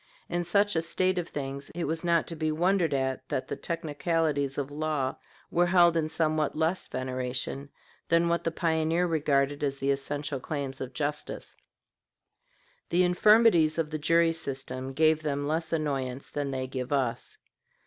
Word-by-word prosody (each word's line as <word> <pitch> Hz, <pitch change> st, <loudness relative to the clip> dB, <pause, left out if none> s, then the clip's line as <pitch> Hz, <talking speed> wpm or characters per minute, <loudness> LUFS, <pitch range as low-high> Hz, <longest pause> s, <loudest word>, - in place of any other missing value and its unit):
In 175 Hz, 0 st, 0 dB
such 205 Hz, +3 st, +2 dB
a 165 Hz, -, +2 dB
state 185 Hz, +2 st, 0 dB
of 170 Hz, -, -5 dB
things 140 Hz, -1 st, -5 dB
it 175 Hz, -, -2 dB
was 160 Hz, +2 st, -2 dB
not 170 Hz, -1 st, +2 dB
to 165 Hz, -, -6 dB
be 155 Hz, 0 st, -1 dB
wondered 175 Hz, +1 st, +2 dB
at 130 Hz, -1 st, -2 dB
that 130 Hz, -, -2 dB
the -, -, -3 dB
technicalities 155 Hz, -3 st, -1 dB
of 145 Hz, 0 st, -3 dB
law 150 Hz, -3 st, -1 dB, 0.3 s
were 175 Hz, +1 st, +3 dB
held 175 Hz, -1 st, +5 dB
in 160 Hz, -1 st, 0 dB
somewhat 155 Hz, -2 st, 0 dB
less 165 Hz, +4 st, 0 dB
veneration 130 Hz, +2 st, -3 dB, 0.4 s
than 170 Hz, 0 st, +3 dB
what 170 Hz, 0 st, 0 dB
the -, -, +1 dB
pioneer 165 Hz, +1 st, +1 dB
regarded 145 Hz, -3 st, +1 dB
as 140 Hz, -1 st, 0 dB
the 135 Hz, +1 st, +1 dB
essential 140 Hz, 0 st, -2 dB
claims 140 Hz, -1 st, -4 dB
of 130 Hz, 0 st, -5 dB
justice. 145 Hz, +2 st, -4 dB, 1.4 s
The 175 Hz, +2 st, +3 dB
infirmities 180 Hz, -3 st, +5 dB
of 160 Hz, -2 st, -1 dB
the 155 Hz, -, -3 dB
jury 165 Hz, +2 st, +4 dB
system 135 Hz, -3 st, -4 dB
gave 155 Hz, +2 st, +3 dB
them 145 Hz, -2 st, -2 dB
less 160 Hz, +2 st, -1 dB
annoyance 140 Hz, -5 st, -2 dB
than 145 Hz, -1 st, -2 dB
they 130 Hz, -1 st, -2 dB
give 130 Hz, 0 st, -5 dB
us. 130 Hz, -5 st, -1 dB
155 Hz, 165 wpm, -28 LUFS, 140-165 Hz, 1.4 s, held